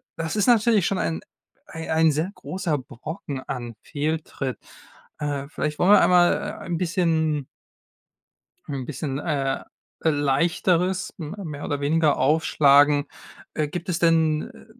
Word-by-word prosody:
das 165 +2 -3
ist 210 +1 +1
natürlich 225 -5 +4
schon 195 - 0
ein 80 -1 -2 0.4
ei 160 0 -7
ein 160 0 +4
sehr 155 +6 -1
großer 180 -7 -3
Brocken 140 +2 -7
an 120 -2 -5
Fehltritt. 150 -3 -3 0.6
Äh, 145 -2 -3
vielleicht 150 -1 -3
wollen 185 - +4
wir 210 - +8
einmal, 175 -1 +5
äh, - - -1 0.3
ein 175 -1 -2
bisschen 160 -5 0 1.2
'n 135 -3 -5
bisschen, 135 +1 -4
äh, 140 -4 -1 0.4
Leichteres, 165 +5 +1
m 160 +2 -6
mehr 150 -3 -6
oder 145 - -2
weniger, 150 +1 +2
aufschlagen. 145 0 +4 0.5
Äh, 155 -1 0
gibt 175 +5 -6
es 175 - 0
denn, 160 -2 +3
äh, - - -16
155 Hz, 140 wpm, -24 LUFS, 145-170 Hz, 1.2 s, wir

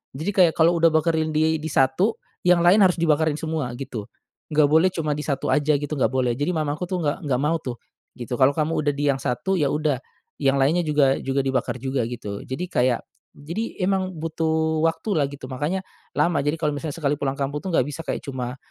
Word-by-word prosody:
Jadi 160 +9 -2
kayak 175 -4 +5
kalau 170 +2 +5
udah 165 -1 +4
bakarin 160 0 +1
di 160 +1 +2
di 160 - -5
satu, 135 - +2 0.2
yang 180 -1 +5
lain 195 +4 +6
harus 180 -2 +3
dibakarin 160 -2 +2
semua 155 -5 -2
gitu. 110 -6 -6 0.4
Nggak 150 -1 +4
boleh 160 +4 +5
cuma 155 -5 -2
di 150 - -4
satu 140 -3 -2
aja 150 0 +2
gitu, 150 +1 -4
nggak 125 -4 +1
boleh. 125 -2 +1
Jadi 145 +7 -1
mamaku 150 +1 -2
tuh 185 - -1
nggak 150 +4 -1
nggak 125 -2 +1
mau 155 +3 +2
tuh 120 -3 -5 0.4
gitu. 120 0 -4
"Kalau 130 +2 +4
kamu 155 +1 0
udah 145 -1 +1
di 145 +1 -1
yang 135 - -3
satu 190 +10 -1
ya 145 - +2
udah, 150 -3 0 0.4
yang 135 0 +3
lainnya 160 +6 +3
juga 145 -4 +3
juga 135 +1 0
dibakar 130 -1 -1
juga," 130 -1 -1
gitu. 110 -4 -6
Jadi 130 +8 -4
kayak 125 -1 +2 0.3
jadi 170 +11 -5
emang 190 -2 -1
butuh 160 0 0
waktu 165 +6 0
lah 150 -5 +2
gitu, 140 -2 -9
makanya 150 +9 -3 0.3
lama. 165 -4 +2
Jadi 145 +3 -1
kalau 150 -2 0
misalnya 145 +1 -5
sekali 145 -3 0
pulang 135 -1 -2
kampung 145 +1 -2
tuh 190 - -5
gak - - +3
bisa 150 +3 -6
kayak - - -4
cuma 130 -1 -4
150 Hz, 215 wpm, -23 LUFS, 135-165 Hz, 0.4 s, lain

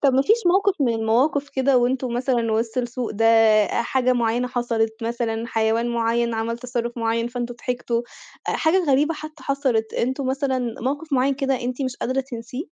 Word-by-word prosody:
طب 275 -3 +4
ما 265 - +4
فيش 435 +10 +4
موقف 385 +2 +3
من 245 -4 +2
المواقف 250 +6 +1
كده 265 -1 +2
وأنتم 250 0 0
مثلًا 240 -2 0
وِسط 225 +3 -1
السوق 245 0 -3
ده، 220 +2 -1
آآ، 225 -1 +4
حاجة 255 +1 +1
معيّنة 240 0 0
حصلت، 230 -2 -1
مثلًا 230 -1 -2
حيوان 225 +1 +1
معيّن 235 0 0
عمل 230 +1 -2
تصرّف 240 -1 -4
معيّن 230 0 0
فأنتم 240 0 -4
ضحكتوا، 240 -1 -2 0.5
أ - - +2
حاجة 350 +3 +2
غريبة 295 +4 +3
حتى 310 -1 -10
حصلت، 260 -5 0
أنتم 260 +3 -1
مثلًا 260 -3 -1
موقف 285 +5 -3
معيّن 270 +1 +2
كده 270 -2 -1
أنتِ 250 +2 -3
مش 255 -2 -3
قادرة 260 +2 -1
تنسيه؟ 250 +1 -6
245 Hz, 180 wpm, -23 LUFS, 230-270 Hz, 0.5 s, طب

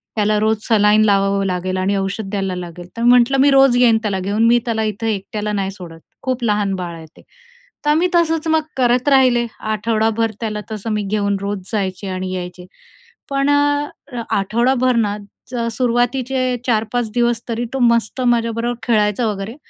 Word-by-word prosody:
त्याला 210 0 +1
रोज 220 0 +1
सलाईन 215 -1 +4
लावावं 195 -1 +2
लागेल 185 0 -2
आणि 195 +2 0
औषध 195 +1 -3
द्यायला 195 -2 -2
लागेल." 175 0 -8
तर 230 - -3
मी 240 - +5
म्हटलं, 250 +2 +5
"मी 280 +1 +5
रोज 270 -2 +5
येईन 235 -2 +5
त्याला 200 -3 -2
घेऊन, 205 +4 0
मी 240 +1 +5
त्याला 220 -2 -1
इथे 215 +1 -1
एकट्याला 210 +2 -4
नाही 195 -1 -1
सोडत, 170 -4 -11 0.2
खूप 255 -1 -2
लहान 205 -3 +1
बाळ 175 -2 -5
आहे 160 -1 -10
ते." - - -15 0.6
तर - - +2
आम्ही 325 +4 +3
तसंच 325 -1 +1
मग 320 0 +3 0.2
करत 250 +1 +2
राहिले 255 -3 +4
आठवडाभर. 220 +1 0
त्याला 210 -2 -3
तसं 215 +1 -5
मी 210 -1 -1
घेऊन 200 -1 0
रोज 200 0 -3
जायचे 195 -2 -2
आणि 185 0 -4
यायचे. 180 0 -7 0.6
पण 275 +1 0
अ, 290 -3 -1
आठवडाभर 240 +5 +1
ना 210 -2 0 0.5
सुरुवातीचे 250 +2 0
4-5 225 0 0
दिवस 240 -1 +1
तरी 230 +1 -2
तो 270 - -2
मस्त 235 +1 +2
माझ्याबरोबर 230 0 0
खेळायचा 215 0 +1
वगैरे 205 +3 -4
220 Hz, 170 wpm, -18 LUFS, 200-245 Hz, 0.6 s, मी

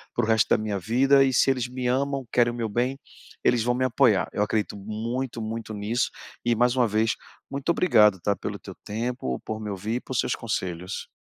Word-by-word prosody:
para 120 - +1
o - - -5
resto 110 -1 +3
da - - +4
minha 105 -2 -2
vida 135 +7 +4
e 130 - +1
se 135 - +4
eles 125 -2 -1
me 125 0 -3
amam, 135 +1 0
querem 120 -1 +3
o - - -7
meu 115 -2 -2
bem, 125 +5 0 0.5
eles 120 -2 +3
vão 120 +1 +2
me 130 - 0
apoiar. 110 -7 +3
Eu - - -2
acredito 105 -1 -1
muito, 115 +4 -4
muito 110 0 -5
nisso, 105 +4 -1 0.3
e 120 -1 +2
mais 120 +2 +3
uma 120 -2 +4
vez, 110 +2 +1 0.4
muito 140 0 -5
obrigado, 110 - +5
tá, 100 - +2
pelo - - -5
teu - - -10
tempo, 110 - -3
por 110 0 -5
me 105 -1 -5
ouvir 105 +4 -3
e - - 0
por - - -6
seus - - +1
conselhos. 90 +1 -4
115 Hz, 220 wpm, -25 LUFS, 105-125 Hz, 0.5 s, obrigado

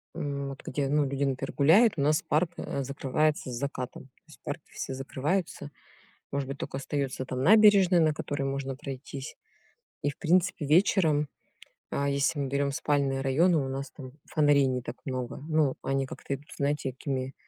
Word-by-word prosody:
м, 140 -1 -3
вот 135 - -9
где, 140 +1 -1
ну, 150 +1 +3
люди, 140 +1 -1
например, 135 0 -2
гуляют, 190 +11 +5
у - - 0
нас 150 +2 +3
парк, 160 +3 +1
а, 140 - -3
закрывается 140 +1 0
с - - -5
закатом. 130 0 -4
То 130 - -27
есть - - -16
парки - - -5
все - - -5
закрываются. 145 +4 -2 0.6
Может 140 -1 -1
быть, 140 - -4
только 135 - -5
остается 140 -2 -3
там 130 0 -3
набережная, 200 -2 +6
на 155 -1 +3
которой 145 -2 -4
можно 135 0 -3
пройтись. 135 0 -7 0.7
И, 145 - +1
в 140 - -13
принципе, 175 -1 +2
вечером, 160 -2 +3 0.7
а, 140 0 0
если 140 +2 +1
мы 140 - -1
берем 140 +1 0
спальные 140 -2 0
районы, 160 +6 +3
у 135 -3 -1
нас 135 +1 -4
там 130 -3 -10 0.2
фонарей 145 -2 +4
не 130 -1 -1
так 120 +1 -7
много. 130 -2 -4
Ну, 155 -4 +2
они 135 0 0
как-то 135 - -6
идут, 145 +2 -15
знаете, 140 -1 0
такими 135 0 -4
140 Hz, 180 wpm, -28 LUFS, 135-155 Hz, 0.7 s, набережная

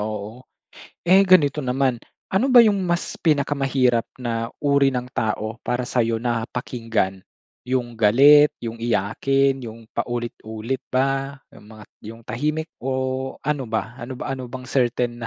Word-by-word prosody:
Oo. 105 +3 -5 0.6
Eh, 190 +3 +6
ganito 150 -5 +4
naman, 130 -2 0 0.3
ano 230 +8 +2
ba 250 -1 +8
'yung 205 -2 +2
mas 175 -1 -1
pinakamahirap 135 -6 +1
na 115 -2 -3
uri 140 -1 +3
ng 125 -2 -3
tao 110 +1 -2
para 125 0 -2
sa'yo 115 -2 0
na 115 -1 -2
pakinggan? 115 -6 -2 0.5
'Yung 125 -2 -1
galit, 140 +7 +6
'yung 115 0 -6
iyakin, 130 +5 +1
'yung 115 0 -10
paulit-ulit 120 0 -4
ba? 135 +1 0 0.2
'Yung - - -16
mga 110 -1 -12 0.3
'yung 115 +1 -11
tahimik 155 +6 -2
o 130 0 -2
ano 150 -2 0
ba? 110 +2 -2
Ano 125 +1 -6
ba 135 - -4
ano 130 -2 -7
bang 130 0 -8
certain 120 -2 0
125 Hz, 140 wpm, -22 LUFS, 115-135 Hz, 0.6 s, ba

